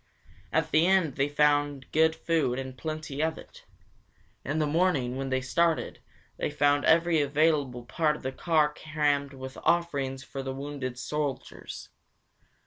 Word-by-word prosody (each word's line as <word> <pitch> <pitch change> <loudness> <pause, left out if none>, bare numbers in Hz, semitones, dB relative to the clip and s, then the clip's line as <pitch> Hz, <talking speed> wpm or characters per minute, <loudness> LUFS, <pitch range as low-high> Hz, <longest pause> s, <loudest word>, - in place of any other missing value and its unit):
At - - 0
the 160 +3 +4
inn 190 -5 +3
they 140 +2 0
found 145 -2 +1
good 160 +1 +3
food 160 -6 0
and 130 -1 -5
plenty 155 +1 -5
of 160 0 0
it. - - -14 0.8
In 145 +3 -2
the 155 - +2
morning, 150 -6 +1
when 135 0 -3
they 130 0 0
started, 165 +5 0 0.4
they - - -1
found 145 -1 +2
every 165 -1 +4
available 145 -4 +1
part 150 +4 +1
of - - -11
the 130 - -2
car 155 +1 +1
crammed 145 -2 -1
with 130 0 -8
offerings 140 -6 0
for 135 - -6
the 135 0 -5
wounded 135 -3 -5
soldiers. 145 +1 -5
145 Hz, 150 wpm, -28 LUFS, 135-160 Hz, 0.8 s, the